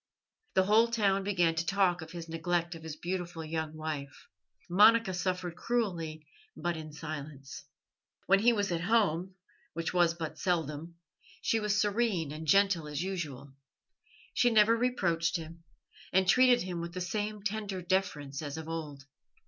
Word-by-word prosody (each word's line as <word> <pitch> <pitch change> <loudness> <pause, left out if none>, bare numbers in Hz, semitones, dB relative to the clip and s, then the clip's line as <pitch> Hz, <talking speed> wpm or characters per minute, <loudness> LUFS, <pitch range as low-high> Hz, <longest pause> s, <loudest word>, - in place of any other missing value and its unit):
The 190 - +5
whole 215 +4 +5
town 200 -4 +1
began 175 -4 +2
to 165 0 -1
talk 180 -1 +2
of 160 - -8
his 170 -1 -7
neglect 170 +1 -1
of 165 - -9
his 160 -1 -6
beautiful 175 -1 -4
young 160 0 -3
wife. 150 -3 -6 0.4
Monica 210 +3 +5
suffered 180 -1 -2
cruelly, 170 -11 -2 0.3
but 175 -1 -1
in 155 -1 -7
silence. 150 -3 -8 0.6
When 195 +1 +5
he 235 +4 +5
was 205 -4 0
at 170 -1 -1
home, 185 -3 +1 0.4
which 165 +1 -3
was 175 -2 +3
but 160 -2 -6
seldom, 165 -2 -2 0.5
she 225 - +2
was 210 -1 +1
serene 205 -7 +1
and 155 +1 -7
gentle 195 -2 +3
as 150 +2 -3
usual. 145 -8 -5 0.8
She 245 - +4
never 225 0 +5
reproached 185 -9 +1
him, 165 +1 -10 0.5
and 190 0 +3
treated 250 +2 +5
him 180 -2 -4
with 170 +1 -6
the - - -3
same 210 +3 -3
tender 205 -2 -3
deference 160 -6 -1
as 145 0 -5
of 160 0 -7
old. 155 -4 -5
175 Hz, 155 wpm, -31 LUFS, 160-200 Hz, 0.8 s, The